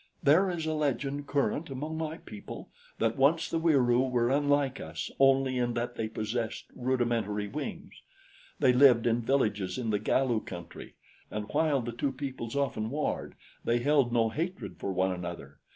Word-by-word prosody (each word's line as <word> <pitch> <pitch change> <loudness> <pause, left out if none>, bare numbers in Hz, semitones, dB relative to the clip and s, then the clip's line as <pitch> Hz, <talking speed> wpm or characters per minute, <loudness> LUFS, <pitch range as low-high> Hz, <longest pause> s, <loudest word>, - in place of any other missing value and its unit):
"There 165 +7 +5
is 170 -3 -3
a 160 - 0
legend 145 -1 -1
current 145 +3 0
among 145 +4 -4
my 160 0 -3
people 105 -2 -10 0.3
that 115 0 0
once 155 +5 +3
the 165 - -1
Wieroo 130 -6 +3
were 120 -1 +1
unlike 145 -1 +2
us 80 0 -5
only 135 -1 +4
in 120 -1 0
that 120 +1 -2
they 110 - -3
possessed 110 +1 -3
rudimentary 120 -5 0
wings. - - -6 0.6
They 125 - +4
lived 125 -3 +6
in 120 0 +2
villages 105 -7 0
in 115 -3 -1
the 105 - +1
Galu 125 -2 +1
country, 85 -2 -9 0.3
and 105 0 -4
while 150 -4 +2
the 120 - -4
two 135 +4 -1
peoples 130 -3 -5
often 130 -6 -1
warred, 150 +4 -2 0.3
they 120 - +2
held 135 0 +3
no 115 -2 +3
hatred 170 +10 -4
for 100 - -2
one 95 0 +1
another. 85 -6 -6
125 Hz, 170 wpm, -29 LUFS, 115-145 Hz, 0.6 s, lived